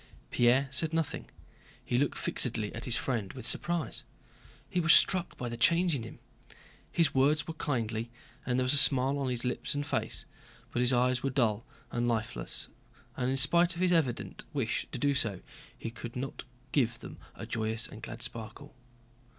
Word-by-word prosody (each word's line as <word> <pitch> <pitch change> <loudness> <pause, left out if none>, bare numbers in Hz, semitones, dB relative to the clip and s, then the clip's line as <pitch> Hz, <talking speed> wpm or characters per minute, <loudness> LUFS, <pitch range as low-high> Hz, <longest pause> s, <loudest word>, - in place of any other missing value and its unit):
Pierre 125 +3 +4
said 160 +4 +1
nothing; 165 -3 -2 0.6
he 120 - +1
looked 145 - 0
fixedly 110 -4 -1
at 115 - -6
his 120 -1 +4
friend 115 -7 -2
with 130 - -8
surprise. 170 -7 -1 0.6
He 180 - -1
was 165 -1 +7
struck 185 -1 +3
by 125 - -4
the 120 0 -5
change 170 +7 +4
in 130 - -3
him. 115 - -9 0.7
His 160 -4 +2
words 145 +3 +3
were 160 - -4
kindly 115 -7 -2 0.3
and 125 -1 0
there 130 - +2
was 125 +2 +2
a - - +6
smile 135 0 +5
on 135 -2 -1
his 125 0 -3
lips 125 +3 -2
and 145 0 -1
face, - - -1 0.5
but - - -1
his 125 +1 +4
eyes 125 0 +2
were 135 - 0
dull 115 -5 +1 0.2
and 120 0 0
lifeless 110 - -2 0.5
and 125 0 -1
in 135 - +1
spite 170 +5 +5
of 175 - -4
his 180 -1 +3
evident 135 -8 0
wish 125 -5 -1
to - - -3
do 140 +3 +2
so 105 -8 0 0.4
he 115 - -5
could 120 0 -8
not 130 +1 -5 0.3
give 120 -5 +1
them - - -10 0.2
a - - -7
joyous 110 0 -2
and 110 - -10
glad 115 +1 -6
sparkle. 115 +6 -6
125 Hz, 185 wpm, -31 LUFS, 115-145 Hz, 0.7 s, was